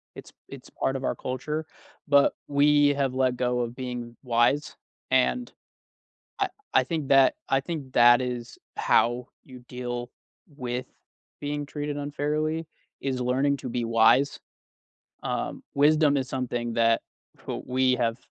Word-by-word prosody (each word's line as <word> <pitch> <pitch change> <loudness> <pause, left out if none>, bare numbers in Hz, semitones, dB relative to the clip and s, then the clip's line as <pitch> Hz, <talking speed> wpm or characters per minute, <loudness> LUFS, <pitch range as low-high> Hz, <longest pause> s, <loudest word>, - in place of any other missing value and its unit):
It's - - -12
it's - - -11
part 135 - -1
of 135 - -4
our - - 0
culture. 150 +5 -4 0.4
But 140 -1 +5
we 145 0 +4
have 135 -2 0
let 130 -1 +1
go 125 0 0
of 120 0 -4
being 125 -2 -6
wise. 125 +4 +1 0.4
And 130 - +2 0.9
I - - +1 0.3
I - - +6
think 160 -5 -3
that 135 -1 +6 0.2
I 135 - +3
think 145 -3 -6
that 120 +1 +7
is 125 -2 -5 0.2
how 120 +2 +2
you 130 -2 -12
deal 120 -1 -5 0.5
with 125 -1 -3 0.6
being 145 0 -3
treated 145 0 -4
unfairly, 150 +2 -2 0.3
is 130 -2 -2
learning 135 +3 +1
to 130 - -6
be 120 0 -2
wise. 115 +5 +4 0.8
Um, - - -3
wisdom 150 0 +4
is 130 -1 -1
something 120 -3 -3
that 115 0 +3 0.5
wh - - -3
we 130 0 +2
have 115 -2 0
130 Hz, 140 wpm, -26 LUFS, 120-145 Hz, 0.9 s, that